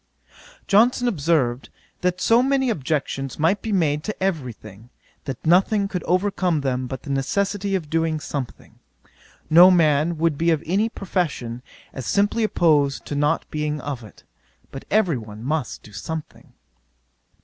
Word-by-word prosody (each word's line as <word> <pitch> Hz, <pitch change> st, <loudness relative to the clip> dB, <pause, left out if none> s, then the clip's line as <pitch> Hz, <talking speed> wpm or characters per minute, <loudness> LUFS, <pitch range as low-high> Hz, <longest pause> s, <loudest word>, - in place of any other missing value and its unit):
'Johnson 240 Hz, +4 st, +3 dB
observed, 145 Hz, -, 0 dB, 0.3 s
that 180 Hz, 0 st, -1 dB
so 230 Hz, +1 st, +4 dB
many 265 Hz, -1 st, +1 dB
objections 135 Hz, -, -3 dB
might 170 Hz, +6 st, +1 dB
be 225 Hz, -, -4 dB
made 150 Hz, -6 st, +1 dB
to 215 Hz, -3 st, -5 dB
every 160 Hz, -10 st, -1 dB
thing, 110 Hz, +1 st, -14 dB, 0.4 s
that 135 Hz, -3 st, -6 dB
nothing 195 Hz, +5 st, +3 dB
could 180 Hz, -3 st, -4 dB
overcome 180 Hz, -3 st, +1 dB
them 130 Hz, -2 st, -2 dB
but 130 Hz, +1 st, -7 dB
the 145 Hz, -, -9 dB
necessity 200 Hz, +8 st, -1 dB
of 170 Hz, -5 st, -3 dB
doing 160 Hz, 0 st, 0 dB
something. 140 Hz, -4 st, -7 dB, 0.7 s
No 175 Hz, +4 st, +8 dB
man 160 Hz, -2 st, +3 dB
would 160 Hz, -2 st, 0 dB
be 165 Hz, +1 st, +2 dB
of 160 Hz, -1 st, +1 dB
any 200 Hz, +7 st, +1 dB
profession, 155 Hz, -, -3 dB, 0.3 s
as 130 Hz, -, -6 dB
simply 205 Hz, +3 st, +1 dB
opposed 150 Hz, -9 st, +2 dB
to -, -, -5 dB
not 150 Hz, +3 st, +1 dB
being 150 Hz, 0 st, -2 dB
of 135 Hz, -4 st, -5 dB
it: 105 Hz, -, -15 dB, 0.5 s
but 135 Hz, -, -8 dB
every 185 Hz, -, +2 dB
one 110 Hz, 0 st, -10 dB
must 145 Hz, -1 st, -3 dB
do 105 Hz, -, -15 dB
something. 155 Hz, +9 st, -7 dB
160 Hz, 150 wpm, -22 LUFS, 140-190 Hz, 0.7 s, No